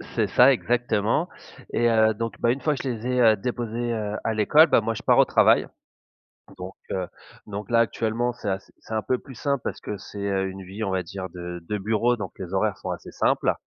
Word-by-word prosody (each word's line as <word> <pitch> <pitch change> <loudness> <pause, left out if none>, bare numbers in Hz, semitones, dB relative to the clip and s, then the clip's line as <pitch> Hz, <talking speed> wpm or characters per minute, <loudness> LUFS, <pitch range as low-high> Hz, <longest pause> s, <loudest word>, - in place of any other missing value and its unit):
c'est - - +2
ça, - - +6
exactement 120 - 0 0.5
et 120 0 +3
heu, 110 -1 +4
donc, 115 +1 -5
bah, 115 - +3
une 135 +3 -3
fois 150 +2 +1
je - - -4
les 120 -1 -3
ai, 125 0 +1
heu, 110 -2 +6
déposés, 120 +1 -3
heu, 105 -2 -3
à 115 - 0
l'école, 150 +10 +5
bah, - - +4
moi, 115 +1 -1
je 110 - -8
pars - - +4
au - - +7
travail - - +4 0.9
donc, 90 +1 -8 0.2
heu, 95 -2 -2 0.4
donc 100 -1 -6
là, 115 - +4
actuellement, 115 +1 0
c'est 105 -4 -5
à 95 0 -1
c'est 110 - -13
un 110 - 0
peu 125 +5 0
plus 130 -1 -13
simple, 140 -1 -1
parce - - -4
que 105 - -5
c'est, 100 +2 -10
heu, 100 -1 0
une 95 0 -9
vie, 100 +4 -6
on 100 - -1
va 95 - 0
dire, 95 +2 -6
de 90 -1 -7
de 105 - 0
bureau, 110 +4 +1
donc 100 -3 -6
les 95 -1 -7
horaires 100 0 +1
sont - - -6
assez - - -7
simples - - +1
110 Hz, 235 wpm, -25 LUFS, 100-120 Hz, 0.9 s, au